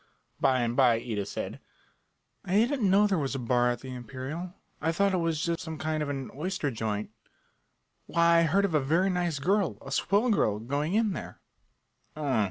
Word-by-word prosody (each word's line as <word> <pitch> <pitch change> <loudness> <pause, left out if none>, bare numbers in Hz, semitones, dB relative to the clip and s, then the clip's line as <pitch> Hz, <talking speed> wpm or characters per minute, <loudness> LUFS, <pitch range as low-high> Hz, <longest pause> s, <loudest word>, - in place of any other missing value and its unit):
By 130 -1 +3
and 120 0 -1
by 125 -3 +5
Ida 110 -3 -3
said: - - -5 0.8
"I 185 - -1
didn't 235 -1 +3
know 200 +2 +5
there 195 -4 +1
was 140 -1 -2
a - - -1
bar 125 0 +2
at 120 - -2
the 130 -1 -7
Imperial. 135 - -6 0.3
I 160 +1 +1
thought 200 +3 +1
it - - +2
was 165 -3 0
just 170 0 -1
some 160 -1 -6
kind 155 0 -2
of 150 - -2
an 135 -2 -4
oyster 155 -1 -2
joint. 110 -2 -3 1.0
Why, 170 0 +4
I - - +4
heard 200 +5 +3
of 185 - -2
a 155 - +4
very 165 +8 +2
nice 175 -4 -1
girl, 180 - +1
a 135 - -10
swell 205 - +2
girl, 105 - +2
going 145 - -2
in 220 -3 +2
there." - - -7
155 Hz, 190 wpm, -28 LUFS, 130-185 Hz, 1.0 s, by